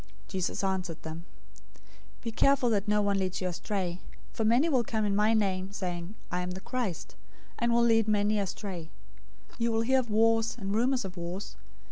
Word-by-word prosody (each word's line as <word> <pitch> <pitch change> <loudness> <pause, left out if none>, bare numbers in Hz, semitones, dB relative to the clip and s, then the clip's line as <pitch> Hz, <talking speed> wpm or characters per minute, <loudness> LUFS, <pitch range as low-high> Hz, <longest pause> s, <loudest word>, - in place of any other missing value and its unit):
024:004 - - -25
Jesus 185 0 -2
answered 185 -4 -2
them, 160 +2 -7 1.0
"Be 230 - -2
careful 255 +1 +3
that 205 -1 +1
no 210 0 +3
one 200 -1 +2
leads 185 -1 -1
you 185 - -1
astray. 180 0 -3 0.3
024:005 - - -24
For 225 - 0
many 240 +8 +4
will 260 -7 +3
come 220 -1 -1
in 200 -1 +1
my 215 +2 +4
name, 190 -2 0
saying, 180 0 -4 0.2
'I 180 - 0
am 180 0 -3
the - - -5
Christ,' 200 - -3 0.5
and 235 0 +2
will 235 0 +4
lead 225 -2 +4
many 210 0 +2
astray. 190 -4 -4 0.6
024:006 - - -18
You 230 0 +2
will 225 0 +2
hear 260 +3 +3
of 240 -3 -3
wars 225 +1 +3
and 200 -3 -3
rumors 245 +2 +2
of 185 -1 -7
wars. 175 +4 -5
205 Hz, 200 wpm, -30 LUFS, 185-225 Hz, 1.0 s, many